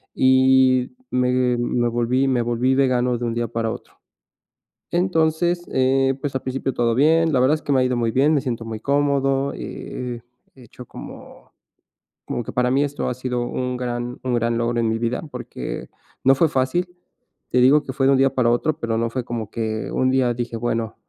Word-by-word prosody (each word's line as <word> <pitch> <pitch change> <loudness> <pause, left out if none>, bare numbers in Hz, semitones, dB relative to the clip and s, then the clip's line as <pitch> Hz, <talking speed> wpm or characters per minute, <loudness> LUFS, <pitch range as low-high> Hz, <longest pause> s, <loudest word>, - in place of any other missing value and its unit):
y 130 - +4 0.2
me 125 -1 +1
me 120 0 0
volví 120 +3 +1
me 130 -2 +1
volví 120 +2 +1
vegano 125 -2 +2
de 120 - -3
un 115 - -1
día 120 0 -1
para 115 -1 -2
otro. - - -9 1.0
Entonces, 175 0 +1
eh, 135 +1 +2
pues, 145 - -3
al 130 - -1
principio 135 +1 -2
todo 115 -1 +1
bien. 160 +4 +3
La 130 - +3
verdad 135 +4 +4
es 155 - -7
que 145 - -1
me 130 - +3
ha - - +3
ido 125 -1 0
muy 115 -1 0
bien, 140 +6 +3
me 150 - +3
siento 120 -3 -3
muy 110 -1 -5
cómodo, 140 0 +1
eh, 125 -2 -6 0.3
he 130 - -15
hecho 120 +2 -12
como - - -12 0.7
como - - -3
que - - -7
para 125 0 +1
mí 135 +2 +3
esto 145 -1 -3
ha - - -1
sido 125 -1 -3
un 125 0 -3
gran 120 0 -4
un 130 -1 -1
gran 115 0 0
logro 120 0 0
en 115 - +1
mi 110 - 0
vida, 120 +1 -1
porque - - -6 0.3
no 135 +1 +5
fue 160 +5 +3
fácil, 135 +6 0 0.6
te 125 - +2
digo 145 +4 +5
que - - -6
fue 135 0 0
de - - +5
un - - +3
día 135 0 +3
para 125 -3 +2
otro, 150 +6 0
pero 115 -1 -1
no 115 +1 0
fue 125 +2 -3
como 115 -3 -4
que 110 -1 -3
un 130 - +1
día 130 -2 +2
dije: 120 0 -4
"Bueno, 115 -1 -2
125 Hz, 210 wpm, -22 LUFS, 120-135 Hz, 1.0 s, no